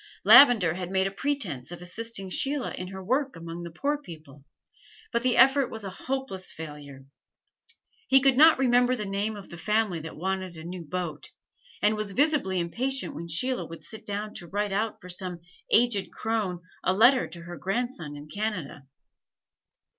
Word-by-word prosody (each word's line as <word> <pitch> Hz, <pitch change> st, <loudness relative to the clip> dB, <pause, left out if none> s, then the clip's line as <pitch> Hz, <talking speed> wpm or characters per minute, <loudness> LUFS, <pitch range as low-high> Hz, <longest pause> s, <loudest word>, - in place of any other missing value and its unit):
Lavender 225 Hz, -, +8 dB
had 180 Hz, 0 st, -5 dB
made 190 Hz, 0 st, +1 dB
a 195 Hz, -, -1 dB
pretense 195 Hz, -, -3 dB
of 175 Hz, -, -7 dB
assisting 195 Hz, +2 st, -1 dB
Sheila 275 Hz, +6 st, 0 dB
in 180 Hz, -, -6 dB
her 190 Hz, 0 st, -8 dB
work 265 Hz, +5 st, 0 dB
among 165 Hz, +1 st, -7 dB
the 170 Hz, -, -6 dB
poor 285 Hz, -, -2 dB
people, 155 Hz, -, -12 dB, 0.7 s
but 235 Hz, -, 0 dB
the 255 Hz, 0 st, +1 dB
effort 270 Hz, -1 st, +5 dB
was 220 Hz, -1 st, -7 dB
a 195 Hz, -, -5 dB
hopeless 255 Hz, -4 st, -3 dB
failure. 145 Hz, -4 st, -9 dB, 1.0 s
He 270 Hz, -, +6 dB
could 270 Hz, -1 st, +4 dB
not 315 Hz, +4 st, +7 dB
remember 250 Hz, -1 st, +3 dB
the 210 Hz, -4 st, -4 dB
name 200 Hz, +2 st, -2 dB
of 200 Hz, -2 st, -10 dB
the 170 Hz, -, -9 dB
family 210 Hz, -3 st, 0 dB
that 160 Hz, +1 st, -8 dB
wanted 185 Hz, 0 st, -3 dB
a 160 Hz, -, -9 dB
new 175 Hz, +1 st, -7 dB
boat, 165 Hz, -2 st, -5 dB, 0.5 s
and 210 Hz, +1 st, +4 dB
was 215 Hz, -2 st, -3 dB
visibly 275 Hz, -, +2 dB
impatient 255 Hz, +10 st, -1 dB
when 170 Hz, -, -7 dB
Sheila 250 Hz, +11 st, -1 dB
would 165 Hz, -, -10 dB
sit 220 Hz, -1 st, -7 dB
down 210 Hz, +1 st, -4 dB
to 175 Hz, -, -7 dB
write 205 Hz, +3 st, -2 dB
out 215 Hz, +2 st, -1 dB
for 180 Hz, -, -12 dB
some 180 Hz, -1 st, -5 dB, 0.3 s
aged 230 Hz, -4 st, +3 dB
crone 210 Hz, -6 st, -2 dB, 0.2 s
a 185 Hz, -, +2 dB
letter 245 Hz, +5 st, +5 dB
to 170 Hz, -1 st, -10 dB
her 175 Hz, 0 st, -8 dB
grandson 195 Hz, -, -3 dB
in 145 Hz, +1 st, -10 dB
Canada. 180 Hz, -8 st, -4 dB
195 Hz, 175 wpm, -27 LUFS, 170-245 Hz, 1.0 s, Lavender